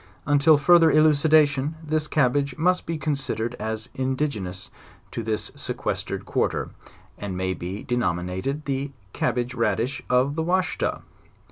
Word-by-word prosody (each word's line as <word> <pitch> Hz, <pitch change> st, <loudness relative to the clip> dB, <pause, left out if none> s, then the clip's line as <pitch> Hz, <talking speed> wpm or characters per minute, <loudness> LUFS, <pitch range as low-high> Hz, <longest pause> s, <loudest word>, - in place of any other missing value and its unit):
Until 145 Hz, +1 st, +5 dB
furth 175 Hz, +4 st, +6 dB
er 165 Hz, -, +6 dB
elucidation, 155 Hz, -1 st, +4 dB
this 155 Hz, 0 st, 0 dB
cabbage 140 Hz, -1 st, +1 dB
must 180 Hz, +3 st, +1 dB
be 165 Hz, -1 st, -2 dB
considered 135 Hz, -6 st, -2 dB
as 110 Hz, 0 st, -4 dB
idigenoua 130 Hz, -9 st, -2 dB, 0.4 s
to -, -, -3 dB
this 110 Hz, -1 st, -2 dB
sequestered -, -, -4 dB
quarter, -, -, -1 dB, 0.5 s
and 100 Hz, -3 st, -4 dB
may 95 Hz, 0 st, -1 dB
be 95 Hz, +3 st, -6 dB
denominated 120 Hz, -, -2 dB
the 140 Hz, 0 st, -2 dB, 0.2 s
cab 120 Hz, -, 0 dB
bage 125 Hz, 0 st, -2 dB
radish 115 Hz, +3 st, 0 dB
of 125 Hz, +3 st, +3 dB
the 160 Hz, -, -2 dB
Washita. 180 Hz, +2 st, 0 dB
135 Hz, 135 wpm, -24 LUFS, 110-155 Hz, 0.5 s, furth